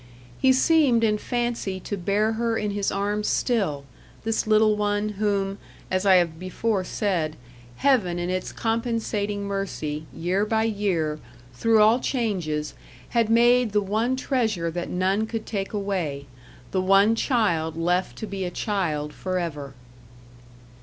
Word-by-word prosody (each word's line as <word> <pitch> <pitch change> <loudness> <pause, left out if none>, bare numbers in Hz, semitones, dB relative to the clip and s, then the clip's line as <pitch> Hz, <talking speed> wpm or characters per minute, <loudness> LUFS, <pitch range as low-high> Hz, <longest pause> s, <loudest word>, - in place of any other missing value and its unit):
He 265 - +5
seemed 260 -3 +4
in 210 -1 +2
fancy 240 -6 -2
to 205 - -4
bear 205 +4 +1
her 230 0 0
in 210 -1 -1
his 200 -1 -1
arms 205 +1 -1
still 195 - 0 0.4
this 225 -1 -1
little 215 0 +4
one, 205 0 0
whom, 200 -1 -1 0.3
as 185 +1 +1
I 190 - +7
have 170 -3 +2
before 190 +2 -1
said, 180 -6 -1 0.4
Heaven 215 - +2
in 175 0 -2
its 185 0 -3
compensating 225 -3 -2
mercy, 160 -6 -4
year 180 +4 0
by 220 +1 +1
year, 190 -8 -1 0.3
through 220 - +4
all 225 +3 +5
changes, 180 - -2 0.4
had 230 -2 +1
made 240 0 +4
the 210 - +3
one 220 +6 0
treasure 220 - -1
that 175 +1 -4
none 190 +4 0
could 225 -1 -4
take 195 -3 -3
away 185 -9 -2 0.5
the 190 - +1
one 195 +3 +5
child 175 - 0
left 180 +2 0
to 220 - -4
be 195 -2 -4
a 180 - -2
child 165 -7 -2
for 185 -1 -3
ever. 145 -6 -4
205 Hz, 145 wpm, -25 LUFS, 180-225 Hz, 0.5 s, I